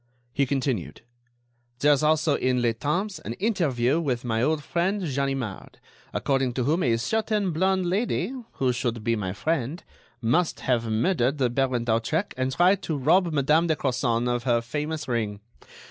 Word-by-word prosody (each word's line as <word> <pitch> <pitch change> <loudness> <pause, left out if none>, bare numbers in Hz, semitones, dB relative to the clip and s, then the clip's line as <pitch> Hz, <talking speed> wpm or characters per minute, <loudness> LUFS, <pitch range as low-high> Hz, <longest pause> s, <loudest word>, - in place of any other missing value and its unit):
He 140 +1 +1
continued: 130 - -2 0.8
"There 145 +3 +4
is 140 - +1
also 155 0 +3
in 130 -2 +1
'Le 120 -1 +2
Temps' 180 - -2
an 110 - -5
interview 150 - +1
with 130 -7 -2
my 115 -1 0
old 150 +3 +1
friend 185 +6 0
Ganimard, 135 - -3 0.3
according 135 -3 0
to 125 - -1
whom 155 +8 +1
a 120 -7 +2
certain 210 - 0
blonde 185 +3 +1
lady, 195 +3 0 0.2
who 130 -2 0
should 120 -3 -2
be 115 +1 +1
my 95 -4 -3
friend, 155 - -2 0.4
must 125 +9 +1
have 115 -3 0
murdered 130 +3 +1
the 125 -4 +1
Baron 130 -2 0
d'Hautrec 120 - 0
and 130 0 -1
tried 180 +7 +3
to 160 -5 -2
rob 175 +6 +3
Madame 150 +3 +3
de 160 - +2
Crozon 125 -3 0
of 120 0 0
her 120 -2 +2
famous 150 +6 -4
ring. 110 -5 -2
135 Hz, 165 wpm, -25 LUFS, 120-165 Hz, 0.8 s, There